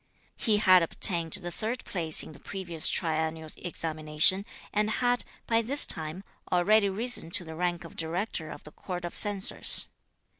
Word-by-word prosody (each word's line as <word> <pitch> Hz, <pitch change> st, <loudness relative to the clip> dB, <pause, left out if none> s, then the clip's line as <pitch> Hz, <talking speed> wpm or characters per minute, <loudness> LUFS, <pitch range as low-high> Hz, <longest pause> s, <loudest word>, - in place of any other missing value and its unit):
He 215 Hz, -2 st, +1 dB
had 185 Hz, -3 st, +5 dB
obtained 165 Hz, 0 st, +1 dB
the 185 Hz, -4 st, -2 dB
third 225 Hz, +7 st, -5 dB
place 165 Hz, -4 st, +3 dB
in -, -, -11 dB
the 150 Hz, -, -15 dB
previous 175 Hz, -3 st, +2 dB
triennial 160 Hz, -1 st, -2 dB
examination, 160 Hz, +2 st, +1 dB, 0.3 s
and 210 Hz, +1 st, 0 dB
had, 245 Hz, +2 st, 0 dB, 0.2 s
by 225 Hz, 0 st, +1 dB
this 275 Hz, +6 st, +1 dB
time, 160 Hz, +4 st, -3 dB, 0.3 s
already 200 Hz, +3 st, +2 dB
risen 220 Hz, -3 st, -3 dB
to 175 Hz, +1 st, +1 dB
the 160 Hz, -, -9 dB
rank 175 Hz, +1 st, -3 dB
of 165 Hz, -, -13 dB
Director 165 Hz, 0 st, -4 dB
of -, -, -11 dB
the 150 Hz, -, -13 dB
Court 180 Hz, +1 st, -7 dB
of 175 Hz, -, -7 dB
Censors. 205 Hz, -2 st, +5 dB
175 Hz, 160 wpm, -27 LUFS, 160-205 Hz, 0.3 s, had